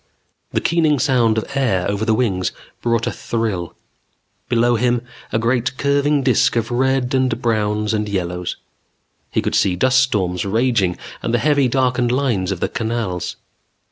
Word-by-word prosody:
The -, -, 0 dB
keening 160 Hz, -3 st, +2 dB
sound 120 Hz, -4 st, +2 dB
of 110 Hz, -, 0 dB
air 110 Hz, -10 st, +1 dB
over 100 Hz, +2 st, -1 dB
the 110 Hz, -1 st, +2 dB
wings 95 Hz, -7 st, 0 dB, 0.3 s
brought 115 Hz, -1 st, +1 dB
a -, -, -1 dB
thrill. 110 Hz, -7 st, -3 dB, 0.7 s
Below 120 Hz, 0 st, +3 dB
him, 120 Hz, +1 st, +1 dB, 0.3 s
a -, -, +1 dB
great 120 Hz, +2 st, 0 dB
curving 140 Hz, 0 st, +2 dB
disk 130 Hz, -3 st, +3 dB
of 115 Hz, 0 st, -1 dB
reds 130 Hz, +1 st, +1 dB
and 130 Hz, -3 st, +1 dB
browns 105 Hz, -2 st, 0 dB
and 105 Hz, -1 st, -1 dB
yellows. 90 Hz, -2 st, -3 dB, 0.7 s
He -, -, -1 dB
could -, -, -2 dB
see 95 Hz, -2 st, +2 dB
dust 130 Hz, +7 st, +3 dB
storms 95 Hz, -9 st, 0 dB
raging 105 Hz, -3 st, +1 dB, 0.2 s
and 120 Hz, -, 0 dB
the -, -, +4 dB
heavy, 140 Hz, +2 st, +3 dB
darkened 125 Hz, -1 st, +1 dB
lines 120 Hz, -8 st, 0 dB
of 95 Hz, -, -4 dB
the -, -, +1 dB
canals. 110 Hz, -6 st, -3 dB
115 Hz, 160 wpm, -19 LUFS, 105-130 Hz, 0.7 s, the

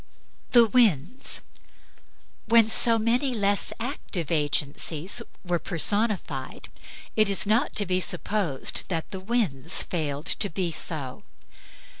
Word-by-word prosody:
THE 240 Hz, -2 st, +6 dB
WINDS 220 Hz, -, +1 dB, 1.1 s
When 225 Hz, 0 st, +5 dB
so 230 Hz, 0 st, +5 dB
many 245 Hz, +4 st, 0 dB
less 205 Hz, -2 st, +1 dB
active 225 Hz, -, -5 dB
agencies 150 Hz, +2 st, 0 dB, 0.2 s
were 175 Hz, -1 st, -1 dB
personified, 185 Hz, -, -1 dB, 0.5 s
it 215 Hz, -2 st, +3 dB
is 200 Hz, -, +1 dB
not 220 Hz, +7 st, +1 dB
to 205 Hz, -, +5 dB
be 185 Hz, 0 st, 0 dB
supposed 180 Hz, -5 st, -1 dB
that 165 Hz, -3 st, -4 dB
the 190 Hz, -, -6 dB
winds 185 Hz, -, 0 dB
failed 150 Hz, -3 st, -4 dB
to 200 Hz, -, +3 dB
be 180 Hz, -1 st, -3 dB
so. 145 Hz, -5 st, -4 dB
190 Hz, 115 wpm, -25 LUFS, 160-225 Hz, 1.1 s, THE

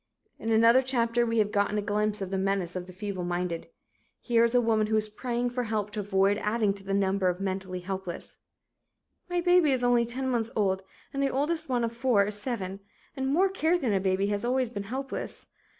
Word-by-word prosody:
In 225 Hz, -, -4 dB
another 230 Hz, +3 st, +6 dB
chapter, 240 Hz, -2 st, +1 dB
we 230 Hz, 0 st, 0 dB
have 210 Hz, -1 st, +2 dB
gotten 205 Hz, 0 st, +1 dB
a -, -, +1 dB
glimpse 210 Hz, 0 st, 0 dB
of 190 Hz, -, -6 dB
the 195 Hz, -, 0 dB
menace 190 Hz, -2 st, -1 dB
of 180 Hz, 0 st, -4 dB
the -, -, -9 dB
feebleminded. 180 Hz, -3 st, -3 dB, 0.5 s
Here 235 Hz, -2 st, +2 dB
is 235 Hz, +1 st, +2 dB
a -, -, +7 dB
woman 220 Hz, -2 st, +2 dB
who 220 Hz, -, +1 dB
is 215 Hz, 0 st, +2 dB
praying 240 Hz, +3 st, -2 dB
for 245 Hz, 0 st, -2 dB
help 210 Hz, -2 st, -2 dB
to 210 Hz, -, -4 dB
avoid 200 Hz, 0 st, +2 dB
adding 210 Hz, -1 st, +1 dB
to 200 Hz, 0 st, -9 dB
the 195 Hz, 0 st, -1 dB
number 195 Hz, -1 st, +2 dB
of 180 Hz, 0 st, -2 dB
mentally 190 Hz, -1 st, -3 dB
helpless: 185 Hz, -1 st, -6 dB, 0.9 s
"My 355 Hz, 0 st, 0 dB
baby 355 Hz, -4 st, +4 dB
is 255 Hz, -2 st, +1 dB
only 240 Hz, -1 st, +3 dB
10 260 Hz, +3 st, -2 dB
months 235 Hz, -3 st, 0 dB
old 190 Hz, -3 st, +1 dB, 0.3 s
and 275 Hz, -, -1 dB
the 275 Hz, -, +2 dB
oldest 310 Hz, +3 st, -1 dB
one 245 Hz, -2 st, +1 dB
of 230 Hz, -, 0 dB
four 235 Hz, -4 st, +2 dB
is 205 Hz, 0 st, -4 dB
7, 195 Hz, -6 st, -4 dB, 0.4 s
and 265 Hz, -1 st, -2 dB
more 340 Hz, +8 st, +3 dB
care 355 Hz, -2 st, +1 dB
than 250 Hz, -10 st, 0 dB
a 195 Hz, -, +2 dB
baby, 190 Hz, +1 st, +1 dB
has 205 Hz, +1 st, -1 dB
always 250 Hz, 0 st, 0 dB
been 200 Hz, -3 st, -5 dB
helpless. 270 Hz, +2 st, -5 dB
215 Hz, 215 wpm, -28 LUFS, 195-245 Hz, 0.9 s, a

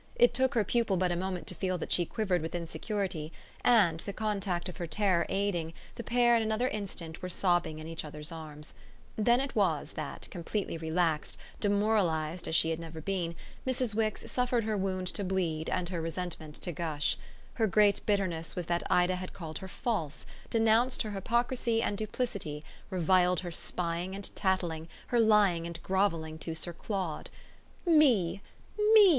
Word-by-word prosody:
It 485 Hz, 0 st, +5 dB
took 260 Hz, 0 st, +2 dB
her 225 Hz, -, +4 dB
pupil 215 Hz, -2 st, +1 dB
but 180 Hz, 0 st, +2 dB
a -, -, +1 dB
moment 185 Hz, 0 st, -3 dB
to -, -, -4 dB
feel 185 Hz, -2 st, -1 dB
that 165 Hz, -, -5 dB
she 175 Hz, -2 st, +3 dB
quivered 195 Hz, -7 st, 0 dB
with 160 Hz, +2 st, -4 dB
insecurity, 175 Hz, -1 st, -3 dB, 0.3 s
and, 195 Hz, -10 st, +5 dB
the 200 Hz, -, -4 dB
contact 200 Hz, -5 st, -1 dB
of 180 Hz, -, -7 dB
her 170 Hz, -, -3 dB
terror 185 Hz, 0 st, +2 dB
aiding, 185 Hz, -5 st, 0 dB, 0.2 s
the 235 Hz, -, -6 dB
pair 240 Hz, 0 st, +4 dB
in 230 Hz, -, +3 dB
another 220 Hz, +3 st, +1 dB
instant 185 Hz, -7 st, -5 dB
were 185 Hz, -, -4 dB
sobbing 175 Hz, -3 st, +1 dB
in 155 Hz, -, -7 dB
each 165 Hz, 0 st, -5 dB
other's 150 Hz, 0 st, -6 dB
arms. 155 Hz, -2 st, -7 dB, 0.4 s
Then 235 Hz, +3 st, +4 dB
it 275 Hz, 0 st, -3 dB
was 180 Hz, -8 st, +1 dB
that, 155 Hz, -2 st, -6 dB
completely 180 Hz, +2 st, -3 dB
relaxed, 160 Hz, -1 st, 0 dB, 0.2 s
demoralised 200 Hz, -6 st, +1 dB
as 160 Hz, -, 0 dB
she 165 Hz, 0 st, +4 dB
had 160 Hz, -, -2 dB
never 165 Hz, -1 st, -7 dB
been, 170 Hz, -1 st, -2 dB, 0.3 s
Mrs. 250 Hz, -3 st, +1 dB
Wix 215 Hz, -1 st, -1 dB
suffered 250 Hz, -2 st, +1 dB
her 215 Hz, 0 st, 0 dB
wound 190 Hz, -2 st, -1 dB
to 200 Hz, -, -3 dB
bleed 175 Hz, -4 st, -1 dB
and 175 Hz, -1 st, -1 dB
her 175 Hz, -3 st, -2 dB
resentment 165 Hz, -2 st, -4 dB
to 175 Hz, -, -2 dB
gush. 155 Hz, -2 st, 0 dB, 0.4 s
Her 225 Hz, -2 st, +2 dB
great 205 Hz, +1 st, +4 dB
bitterness 185 Hz, -6 st, 0 dB
was 180 Hz, -, -2 dB
that 170 Hz, +1 st, 0 dB
Ida 180 Hz, +1 st, +3 dB
had 185 Hz, 0 st, -6 dB
called 160 Hz, -4 st, -6 dB
her 190 Hz, -, -7 dB
false, 180 Hz, -, -2 dB, 0.2 s
denounced 230 Hz, +3 st, +3 dB
her 215 Hz, -, -4 dB
hypocrisy 235 Hz, +3 st, +1 dB
and 205 Hz, -, 0 dB
duplicity, 200 Hz, -8 st, -3 dB, 0.3 s
reviled 180 Hz, 0 st, +3 dB
her 175 Hz, -2 st, -5 dB
spying 175 Hz, +2 st, -2 dB
and 200 Hz, 0 st, -6 dB
tattling, 175 Hz, -4 st, 0 dB, 0.2 s
her 240 Hz, -, +3 dB
lying 205 Hz, -7 st, +4 dB
and 170 Hz, -1 st, -6 dB
grovelling 165 Hz, -5 st, 0 dB
to 160 Hz, +1 st, -4 dB
Sir 170 Hz, +2 st, -3 dB
Claude. 185 Hz, -3 st, -3 dB, 0.6 s
"Me, 235 Hz, -, +4 dB, 0.5 s
ME!" 435 Hz, -, +11 dB
185 Hz, 175 wpm, -31 LUFS, 165-215 Hz, 0.6 s, ME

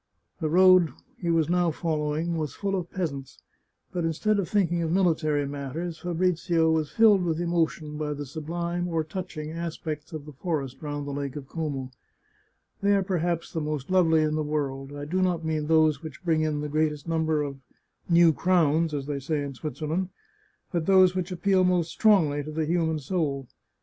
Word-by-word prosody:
The 155 Hz, -3 st, -1 dB
road 185 Hz, -1 st, +6 dB, 0.3 s
he 175 Hz, -, -2 dB
was 165 Hz, -2 st, +3 dB
now 175 Hz, 0 st, +2 dB
following 155 Hz, +1 st, -1 dB
was 155 Hz, -3 st, -3 dB
full 195 Hz, -1 st, -1 dB
of 180 Hz, -2 st, -3 dB
peasants, 140 Hz, -8 st, -4 dB, 0.5 s
but 175 Hz, -2 st, -2 dB
instead 200 Hz, +6 st, +1 dB
of 190 Hz, -, -2 dB
thinking 175 Hz, -5 st, +1 dB
of 160 Hz, -1 st, -1 dB
military 155 Hz, -5 st, +2 dB
matters, 145 Hz, +4 st, -5 dB
Fabrizio 175 Hz, -2 st, +1 dB
was 155 Hz, -2 st, +1 dB
filled 210 Hz, -4 st, +5 dB
with 165 Hz, -2 st, -1 dB
emo 170 Hz, -1 st, +2 dB
tion 150 Hz, -2 st, -9 dB
by 150 Hz, -1 st, -2 dB
the 145 Hz, 0 st, -5 dB
sublime 170 Hz, +4 st, -3 dB
or 165 Hz, -2 st, 0 dB
touching 155 Hz, -2 st, -6 dB
aspects 160 Hz, -2 st, -5 dB
of 155 Hz, -3 st, -7 dB
the 150 Hz, -, -9 dB
forest 140 Hz, -3 st, -3 dB
round 145 Hz, -1 st, -4 dB
the 145 Hz, -, -4 dB
Lake 140 Hz, -1 st, -4 dB
of 140 Hz, -3 st, -7 dB
Como. 140 Hz, -5 st, -4 dB, 0.9 s
They 200 Hz, 0 st, +4 dB
are 195 Hz, -, +2 dB
perhaps 175 Hz, -3 st, -1 dB
the 160 Hz, -, -1 dB
most 150 Hz, 0 st, -3 dB
lovely 165 Hz, -4 st, +4 dB
in 155 Hz, 0 st, 0 dB
the 155 Hz, -, 0 dB
world. 140 Hz, -2 st, -3 dB
I 145 Hz, 0 st, -6 dB
do 185 Hz, +5 st, -1 dB
not 175 Hz, -3 st, 0 dB
mean 155 Hz, -2 st, -1 dB
those 155 Hz, -2 st, +3 dB
which 160 Hz, +2 st, -9 dB
bring 160 Hz, -2 st, +2 dB
in 155 Hz, -1 st, 0 dB
the 150 Hz, -, -3 dB
great 155 Hz, +1 st, +1 dB
est 150 Hz, +1 st, -10 dB
number 160 Hz, -2 st, +1 dB
of 140 Hz, -1 st, -5 dB, 0.3 s
" -, -, -37 dB
new 170 Hz, -2 st, +7 dB
crowns," 165 Hz, -2 st, +2 dB
as 140 Hz, -2 st, -3 dB
they 145 Hz, -1 st, -3 dB
say 145 Hz, +2 st, -2 dB
in 140 Hz, -1 st, -5 dB
Switzerland, 155 Hz, +6 st, -3 dB, 0.6 s
but 170 Hz, -3 st, -1 dB
those 185 Hz, -2 st, +6 dB
which 185 Hz, 0 st, -3 dB
appeal 185 Hz, +1 st, +2 dB
most 180 Hz, -2 st, +2 dB
strongly 165 Hz, -10 st, +3 dB
to 150 Hz, -, -7 dB
the 155 Hz, +1 st, -1 dB
human 160 Hz, -1 st, +1 dB
soul. 145 Hz, -3 st, -2 dB
160 Hz, 195 wpm, -26 LUFS, 150-175 Hz, 0.9 s, new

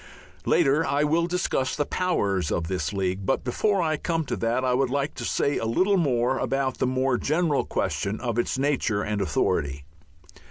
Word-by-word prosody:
Later 140 Hz, +4 st, +3 dB
I 145 Hz, -1 st, +1 dB
will 165 Hz, +3 st, +2 dB
discuss 175 Hz, -7 st, -1 dB
the 145 Hz, -, 0 dB
powers 100 Hz, -, 0 dB
of 85 Hz, -2 st, -1 dB
the 90 Hz, -4 st, -1 dB
League. 95 Hz, -1 st, -2 dB
But 135 Hz, -, 0 dB
before 190 Hz, -, +1 dB
I 155 Hz, -1 st, 0 dB
come 165 Hz, -1 st, -1 dB
to -, -, -2 dB
that 120 Hz, +3 st, 0 dB
I 125 Hz, -, +2 dB
would 130 Hz, 0 st, +1 dB
like 140 Hz, +2 st, -1 dB
to -, -, -7 dB
say 140 Hz, -, 0 dB
a -, -, -3 dB
little 130 Hz, -, +2 dB
about 135 Hz, -1 st, -1 dB
the -, -, +1 dB
more 130 Hz, 0 st, +1 dB
general 155 Hz, -1 st, +1 dB
question 100 Hz, +2 st, -2 dB
of 120 Hz, -2 st, -2 dB
its 120 Hz, -, -1 dB
nature 130 Hz, -7 st, 0 dB
and 105 Hz, -1 st, -2 dB
authority. 75 Hz, -5 st, 0 dB
130 Hz, 185 wpm, -25 LUFS, 110-150 Hz, -, Later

